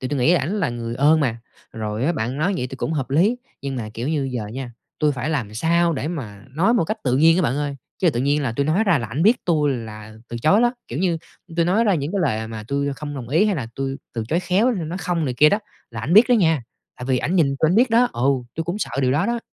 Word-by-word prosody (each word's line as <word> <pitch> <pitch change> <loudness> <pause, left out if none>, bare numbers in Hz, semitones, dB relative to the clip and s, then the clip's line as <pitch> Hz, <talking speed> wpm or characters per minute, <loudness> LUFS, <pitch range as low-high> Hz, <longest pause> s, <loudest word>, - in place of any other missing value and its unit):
tại 130 - -3
tui 145 0 -2
nghĩ 140 +7 +4
ảnh 180 +5 0
là 165 - +1
người 115 -1 -4
ơn 150 +5 +4
mà. 120 -5 0 0.3
Rồi 110 +1 -3
á 170 - +2
bạn 125 -1 -3
nói 175 +6 0
vậy 125 - -2
tui 130 - -8
cũng 155 - -2
hợp 135 -5 -2
lý. 190 - +3 0.3
Nhưng 135 -1 -3
mà, 110 -3 -4
kiểu 120 +4 -3
như, 145 -4 0
giờ 115 -4 -3
nha, 120 +3 -6 0.3
tui 150 -1 +2
phải 130 +4 -3
làm 115 -9 -2
sao 170 +7 +2
để 150 0 -3
mà 115 - -6
nói 180 - +2
một 200 - +2
cách 215 +7 -3
tự 130 -1 +1
nhiên 165 +4 +5
á 185 - +2
bạn 135 -3 0
ơi? 145 -1 -2 0.2
Chứ 175 - +3
tự 120 - -2
nhiên 145 +3 +1
là 125 -5 -1
tui 140 +4 -1
nói 175 +8 +2
ra 185 -7 +3
là 115 - -4
ảnh 130 +8 -2
biết 230 +6 +3
tui 150 -4 +2
là 110 -3 -7
từ 120 - -5
chối 195 +8 +5
đó. 240 +1 +2
Kiểu 120 - -4
như, 170 -2 +1 0.4
tui 170 - +3
nói 195 +7 +2
ra 205 -4 +3
những 150 +2 -2
cái 200 - 0
lời 110 -9 -1
mà 110 -1 -6
tui 140 0 -1
không 145 +1 -6
đồng 125 -4 -6
ý 160 +9 +3
hay 210 -2 +1
là 130 - -3
tui 135 0 -3 0.2
từ 115 - -2
chối 165 +5 +1
khéo, 195 +7 +2
nói 175 -5 -3
"không" 170 -2 -1
này 130 - -2
kia 150 +5 +6
đó 205 - +2 0.3
là 115 -2 -6
ảnh 135 +10 -2
biết 220 +4 +8
đó - - +4
nha, 160 - +2 0.3
tại 125 - -7
vì 130 -1 +1
ảnh 175 - -1
nhìn 165 - +4
tui 160 - +3
ảnh 180 - +2
biết 240 +2 +4
đó 240 +2 +4
ừ, 125 +3 0 0.3
tui 165 - -3
cũng 175 +5 -3
sợ - - -3
điều 130 -1 +2
đó 145 - +1
đó. 235 0 -1
145 Hz, 295 wpm, -22 LUFS, 125-175 Hz, 0.4 s, biết